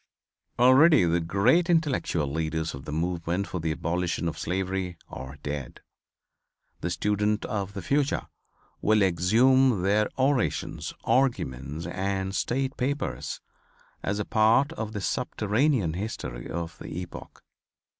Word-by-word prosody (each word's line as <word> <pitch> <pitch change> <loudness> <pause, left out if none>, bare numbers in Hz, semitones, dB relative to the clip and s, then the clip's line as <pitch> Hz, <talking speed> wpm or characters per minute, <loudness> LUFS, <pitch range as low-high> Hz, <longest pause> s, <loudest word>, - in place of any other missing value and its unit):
"Already 130 - +6
the 85 +1 +2
great 100 - +3
intellectual 145 - +1
leaders 80 +2 -2
of 70 0 -9
the - - -5
movement 85 +3 -1
for 90 - -4
the 80 0 -1
abolition 85 +2 -1
of 80 - -2
slavery 95 -1 -2
are 65 +2 -8
dead. 70 -3 -5 1.0
The 85 - -2
student 105 +3 0
of 100 -2 -3
the 100 -2 -6
future 140 +6 +1 0.6
will 105 -1 +4
exhume 110 +6 +4
their 105 +2 +2
orations, 135 -1 0
arguments 75 - 0
and 95 +2 -2
state 130 +6 -1
papers, 140 +3 -2 0.6
as 100 +1 -1
a 105 - -2
part 115 +7 +3
of 110 -8 -5
the 105 - -3
subterranean 105 - 0
history 80 - -5
of 85 -1 -5
the - - -7
epoch. 90 - -9
95 Hz, 125 wpm, -27 LUFS, 85-120 Hz, 1.0 s, Already